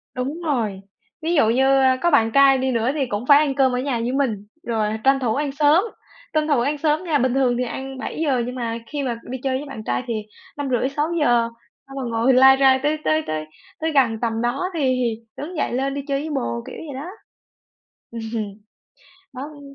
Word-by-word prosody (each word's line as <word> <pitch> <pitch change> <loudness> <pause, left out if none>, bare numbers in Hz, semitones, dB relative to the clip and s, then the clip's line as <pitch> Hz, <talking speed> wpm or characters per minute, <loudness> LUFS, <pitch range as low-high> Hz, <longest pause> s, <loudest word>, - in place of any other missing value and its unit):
Đúng 275 +7 -3
rồi, 220 -10 -1 0.4
ví 330 +2 -1
dụ 225 -7 +4
như, 255 +3 +3 0.2
ơ, 260 -1 +4
có 345 - +2
bạn 225 -5 +4
trai 275 -1 +6
đi 260 0 0
nữa 230 0 +1
thì 290 -3 0
cũng 230 -1 -4
phải 285 -1 +8
ăn 290 -3 +1
cơm 265 -2 +3
ở 250 - -1
nhà 255 -3 -1
với 240 +2 -1
mình 225 -7 -1 0.2
rồi 220 -2 -1
tranh 270 0 +4
thủ 235 -4 0
ăn 285 0 -1
sớm, 295 +6 +4 0.5
tranh 310 0 +1
thủ 285 -5 +3
ăn 285 +5 0
sớm 305 +3 +1
nha. 325 -5 +1
Bình 255 -1 +1
thường 255 -3 +2
thì 250 - 0
ăn 265 +2 -6
7:00 275 -2 -1
nhưng 250 - -5
mà 230 -2 -3
khi 290 -2 -3
mà 235 -3 -3
đi 260 - -3
chơi 260 -1 0
với 290 - -6
bạn 220 -5 -7
trai 120 -7 -1
thì 235 - -1 0.4
5:30-6:00. 275 -2 +1 0.4
Xong 275 0 -10
rồi 250 -3 -3
ngồi 230 +3 +2
lai 265 +1 +7
rai 265 -1 +5
tới 305 +1 +1
tới 310 0 +2
tới 155 0 -3 0.3
tới 320 0 -1
gần 240 -7 +2
tầm 225 -1 -1
đó 240 +9 -1
thì 330 - -3
thì 245 -4 0
đứng 320 +4 -6
dậy 240 - -1
lên 270 +2 -1
đi 280 - -3
chơi 275 0 0
với 310 - -5
bồ, 115 - -2
kiểu - - -8
vậy 300 -3 -8
đó. 315 - -7 1.0
Ừm, 230 -1 -6 1.1
đó, 255 - -6
ưm 285 -1 -10
265 Hz, 220 wpm, -22 LUFS, 235-290 Hz, 1.1 s, phải